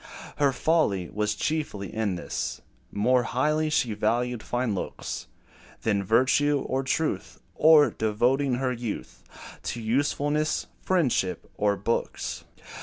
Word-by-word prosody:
Her 140 Hz, -1 st, +3 dB
folly 130 Hz, -, +1 dB
was 105 Hz, 0 st, -1 dB
chiefly 145 Hz, -8 st, -2 dB
in 110 Hz, -4 st, 0 dB
this: 85 Hz, -, -4 dB, 0.3 s
More 125 Hz, +5 st, +3 dB
highly 150 Hz, +6 st, +1 dB
she 125 Hz, -7 st, +1 dB
valued 120 Hz, +3 st, 0 dB
fine 120 Hz, -2 st, -1 dB
looks, 95 Hz, -, -5 dB, 0.6 s
Than 100 Hz, -3 st, +1 dB
virtue, 130 Hz, +7 st, +3 dB
or 130 Hz, +1 st, 0 dB
truth, 145 Hz, +4 st, -2 dB
Or 155 Hz, -1 st, +6 dB
devoting 125 Hz, +5 st, +1 dB
her 130 Hz, 0 st, 0 dB
youth 115 Hz, -3 st, -6 dB, 0.4 s
To 120 Hz, -, -4 dB
usefulness, 145 Hz, +6 st, 0 dB, 0.2 s
friendship, 135 Hz, -, 0 dB
or 105 Hz, -1 st, +1 dB
books. 115 Hz, +4 st, -2 dB
125 Hz, 115 wpm, -26 LUFS, 105-145 Hz, 0.6 s, Or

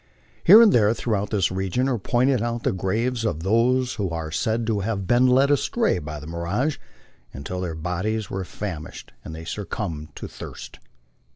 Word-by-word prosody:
Here 215 Hz, +7 st, +9 dB
and 220 Hz, -, +5 dB
there 110 Hz, -1 st, +4 dB
throughout 105 Hz, -3 st, -1 dB
this 100 Hz, -5 st, +1 dB
region 95 Hz, +7 st, -1 dB
are 125 Hz, -4 st, 0 dB
pointed 125 Hz, +4 st, +1 dB
out 120 Hz, 0 st, -2 dB
the -, -, +2 dB
graves 115 Hz, +6 st, -1 dB
of 80 Hz, -8 st, -2 dB
those 125 Hz, +5 st, +2 dB
who 100 Hz, -3 st, -2 dB
are 80 Hz, -2 st, -4 dB
said 110 Hz, +8 st, -1 dB
to 110 Hz, -2 st, 0 dB
have 100 Hz, -1 st, -2 dB
been 120 Hz, +5 st, +4 dB
led 135 Hz, +3 st, +4 dB
astray 220 Hz, -, +1 dB
by 75 Hz, -1 st, -6 dB
the 75 Hz, -, -10 dB
mirage 85 Hz, -, -2 dB, 0.5 s
until 90 Hz, +7 st, -5 dB
their 85 Hz, -3 st, -3 dB
bodies 95 Hz, +7 st, -2 dB
were 95 Hz, 0 st, -4 dB
famished 90 Hz, -4 st, -7 dB
and 80 Hz, -, -8 dB
they 80 Hz, +1 st, -8 dB
suc 100 Hz, +3 st, -5 dB
cumbed 80 Hz, -8 st, -5 dB
to -, -, -6 dB
thirst. -, -, -10 dB
105 Hz, 185 wpm, -24 LUFS, 90-120 Hz, 0.5 s, Here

